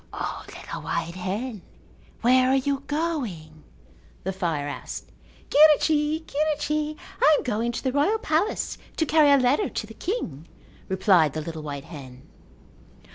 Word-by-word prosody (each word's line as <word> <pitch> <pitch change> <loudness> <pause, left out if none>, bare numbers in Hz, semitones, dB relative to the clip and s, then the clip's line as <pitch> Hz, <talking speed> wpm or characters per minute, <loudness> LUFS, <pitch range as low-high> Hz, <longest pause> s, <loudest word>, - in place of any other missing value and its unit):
"O, - - -4
little - - -8
white 170 - -2
hen, 200 +5 -4 0.6
where 255 +2 +5
are 265 - +4
you 275 +1 +1
going?" 240 - -3 0.6
the 190 - -2
fire 165 -6 -2
asked. 145 - -7 0.4
"Quirrichi, 305 +1 +5
quirrichi, 305 +1 -1 0.2
I 310 - +7
am - - -3
going 235 0 -1
to 240 - -5
the 260 - +1
royal 295 +11 +2
palace 330 0 -1 0.2
to 320 - +2
carry 305 -1 +5
a 280 - +7
letter 270 +10 +2
to - - -4
the 225 - -11
king," 175 - -4 0.4
replied 185 -6 +3
the 155 - -3
little 160 0 -6
white 145 -2 -6
hen. 130 -5 -11
255 Hz, 145 wpm, -25 LUFS, -, 0.6 s, I